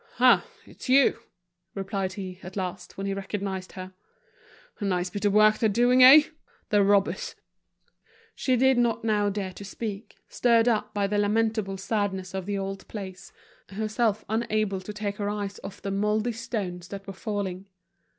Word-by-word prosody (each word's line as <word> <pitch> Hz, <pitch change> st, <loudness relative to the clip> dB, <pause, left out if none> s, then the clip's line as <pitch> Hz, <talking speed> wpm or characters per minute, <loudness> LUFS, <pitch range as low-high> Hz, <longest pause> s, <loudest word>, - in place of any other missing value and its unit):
"Ah! -, -, +6 dB, 0.2 s
it's -, -, -11 dB
you," 270 Hz, +1 st, +5 dB, 0.6 s
replied 195 Hz, -1 st, -3 dB
he, 185 Hz, -2 st, -7 dB
at 185 Hz, 0 st, -10 dB
last, 180 Hz, -2 st, -5 dB
when 195 Hz, -, -4 dB
he 195 Hz, -, -1 dB
recognized 195 Hz, -1 st, -4 dB
her. 185 Hz, 0 st, -8 dB, 0.9 s
"A -, -, -5 dB
nice 180 Hz, -2 st, 0 dB
bit 205 Hz, +2 st, -4 dB
of 205 Hz, -, +3 dB
work 215 Hz, 0 st, +5 dB
they're 220 Hz, -, +3 dB
doing, 245 Hz, +4 st, +4 dB
eh? 275 Hz, +4 st, +10 dB, 0.5 s
the 205 Hz, -1 st, +4 dB
robbers!" 205 Hz, -, +1 dB, 1.0 s
She 255 Hz, -, +1 dB
did 265 Hz, 0 st, +4 dB
not 235 Hz, -2 st, +1 dB
now 210 Hz, -2 st, +2 dB
dare 195 Hz, -2 st, -4 dB
to 200 Hz, -, -10 dB
speak, 205 Hz, +1 st, -6 dB
stirred 235 Hz, -1 st, +3 dB
up 225 Hz, -3 st, +1 dB
by 205 Hz, -1 st, 0 dB
the 205 Hz, +1 st, 0 dB
lamentable 215 Hz, -1 st, 0 dB
sadness 195 Hz, -2 st, -2 dB
of 190 Hz, -1 st, -4 dB
the 205 Hz, -1 st, -1 dB
old 195 Hz, 0 st, -5 dB
place, 190 Hz, -4 st, -8 dB, 0.4 s
herself 215 Hz, +1 st, -1 dB
unable 215 Hz, -3 st, -1 dB
to 185 Hz, -, -7 dB
take 205 Hz, -1 st, -4 dB
her 205 Hz, -1 st, -2 dB
eyes 205 Hz, -1 st, -4 dB
off 195 Hz, -, -9 dB
the 195 Hz, -, -2 dB
moldy 210 Hz, +4 st, 0 dB
stones 200 Hz, -6 st, -4 dB
that 195 Hz, 0 st, -8 dB
were 195 Hz, -, -7 dB
falling. 195 Hz, -2 st, -4 dB
205 Hz, 170 wpm, -26 LUFS, 195-220 Hz, 1.0 s, eh